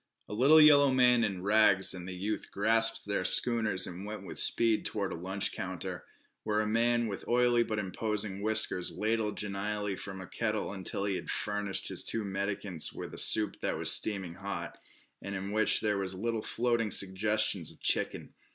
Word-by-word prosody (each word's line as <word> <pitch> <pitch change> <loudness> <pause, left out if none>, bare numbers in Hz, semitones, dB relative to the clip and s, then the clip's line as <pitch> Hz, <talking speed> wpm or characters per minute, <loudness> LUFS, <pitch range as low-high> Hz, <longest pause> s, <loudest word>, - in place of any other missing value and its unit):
A - - -8
little 135 +8 +5
yellow 145 -2 +6
man 125 -2 +3
in 95 -4 -3
rags 100 -2 +3
and 90 -1 -8
the 95 - -7
youth 100 +4 -4
grasped 115 +2 +2
their 100 -2 -2
schooners 110 -3 +2
and 90 +2 -8
went 105 +1 -7
with - - -2
speed 115 -2 +4
toward 100 -2 -3
a - - -5
lunch 95 +3 -2
counter, 95 -1 -6 0.4
where 105 -1 -2
a 110 - 0
man 120 +2 +1
with 100 -3 -7
oily 120 0 +2
but 110 -2 -3
imposing 105 0 -3
whiskers 110 -4 +3
ladled 110 -1 -2
genially 105 0 -4
from 95 0 -8
a 95 - -8
kettle 110 0 -3
until 95 +1 -3
he 100 -2 -1
had - - -9
furnished 105 -2 -2
his - - -4
two 115 - -3
mendicants 100 -3 -2
with - - -9
a - - -5
soup 105 -2 +3
that - - -2
was - - +3
steaming 95 -5 +2
hot, 85 -3 -7 0.4
and 100 0 -6
in 95 +1 -5
which 110 +1 +4
there 105 -2 -1
were 95 - -3
little 110 +4 -2
floating 120 -1 -1
suggestions 100 -2 +1
of - - -10
chicken. - - -1
105 Hz, 185 wpm, -29 LUFS, 95-110 Hz, 0.4 s, yellow